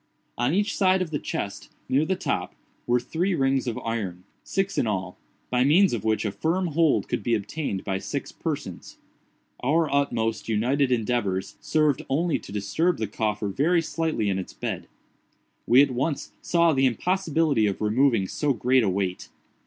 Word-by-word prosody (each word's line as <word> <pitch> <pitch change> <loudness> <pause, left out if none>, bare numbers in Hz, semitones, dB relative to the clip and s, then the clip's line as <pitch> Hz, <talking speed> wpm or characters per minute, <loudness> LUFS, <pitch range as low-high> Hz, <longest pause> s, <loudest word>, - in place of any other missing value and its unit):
On 120 +3 +1
each 205 +4 +1
side 185 -1 +3
of 165 - -8
the 145 - -1
chest, 100 0 -5 0.2
near 140 +4 +2
the 190 - 0
top, - - -3 0.3
were 120 0 +3
three 170 +9 -1
rings 135 -3 +1
of 115 - -2
iron—six 115 - -3
in - - +1
all—by 100 +5 -3
means 175 +7 +5
of 110 -4 -2
which 110 -1 +1
a - - 0
firm 165 - -1
hold 160 -1 +2
could - - -2
be 120 - +1
obtained 105 -1 -3
by 95 -1 -2
six - - -4
persons. - - -5 0.6
Our 150 +3 +1
utmost 115 -6 0
united 130 +5 +1
endeavors 110 -5 -1
served 155 -3 +1
only 160 +4 +1
to - - -12
disturb 105 - 0
the 110 - -1
coffer 105 0 -2
very 165 - +2
slightly 160 -9 -1
in 95 -1 0
its 95 - -7
bed. - - -4 0.8
We 130 +4 +7
at 140 - 0
once 135 +4 -2
saw 170 -1 +3
the 135 -1 +3
impossibility 155 - +1
of 100 - -2
removing 110 -1 +2
so 145 +6 0
great 130 +1 +3
a 105 - +1
weight. 95 -1 -2
130 Hz, 170 wpm, -25 LUFS, 110-160 Hz, 0.8 s, We